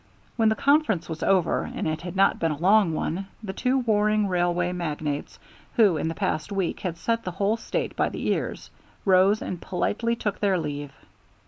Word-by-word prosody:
When 225 -2 +3
the 220 - +1
conference 280 - +2
was 160 -1 -6
over, 185 -4 +2
and - - -4
it 155 0 -2
had 175 +1 -6
not 195 +1 +3
been 165 - +1
a 150 - -3
long 195 +2 +4
one, 185 +5 -2 0.2
the 190 -3 -4
two 255 +6 +1
warring 215 -3 +2
railway 175 -1 +1
magnates, 155 -4 -3 0.4
who 210 -8 +5
in 155 - -1
the 165 - -3
past 155 +5 -2
week 195 -3 -1
had 175 -3 -4
set 230 +5 -1
the - - -3
whole 200 +4 0
State 230 - -3
by - - +1
the - - -6
ears, - - -2 0.3
rose 195 +2 +4
and 180 - -5
politely 230 +6 -1
took 210 -4 -3
their 195 -3 +2
leave. 145 -3 -4
185 Hz, 195 wpm, -25 LUFS, 170-215 Hz, 0.4 s, who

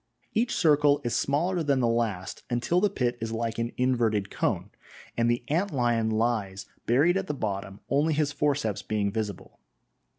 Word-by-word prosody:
Each 235 +2 +1
circle 145 -3 +4
is 120 - -1
smaller 170 +6 +1
than 140 -4 +1
the 125 - +2
last, 115 -6 -1
until 125 +9 +1
the 210 - +3
pit 125 -9 -1
is 115 0 -3
like 115 0 -2
an 115 +1 -1
inverted 115 -6 +1
cone, - - -1 0.4
and 115 0 +2
the 120 0 0
ant 175 +7 +1
lion 120 -4 +1
lies 110 -3 -1 0.2
buried 150 +10 +4
at 195 -1 -3
the 150 - -2
bottom, 100 -4 -4
only 150 +3 +2
his 150 -1 +1
forceps 145 -7 0
being 105 -2 -1
visible. 105 -3 -5
120 Hz, 170 wpm, -27 LUFS, 110-145 Hz, 0.4 s, circle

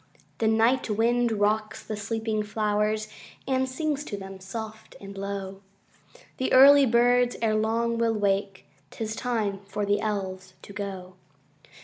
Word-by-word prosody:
The 220 - +2
night 225 +3 +2
wind 235 +2 +2
rocks 215 0 0
the 215 - -4
sleeping 220 +1 -2
flowers, 210 0 -1 0.4
And 260 -1 +1
sings 295 +1 -2
to 205 - -5
them, 195 -1 -9
soft 220 +3 -8
and 200 0 -10
low. 195 0 -5 0.8
The 260 - -1
early 275 +1 +8
birds 245 +1 +3
erelong 225 +1 0
will 230 -1 +1
wake: 195 -3 -1 0.2
âT - - -13
is 220 0 -2
time 220 -6 -2
for 205 +1 -2
the 205 +1 +1
Elves 190 -3 -4
to 200 - -11
go. 190 -2 -6
215 Hz, 140 wpm, -26 LUFS, 200-235 Hz, 0.8 s, early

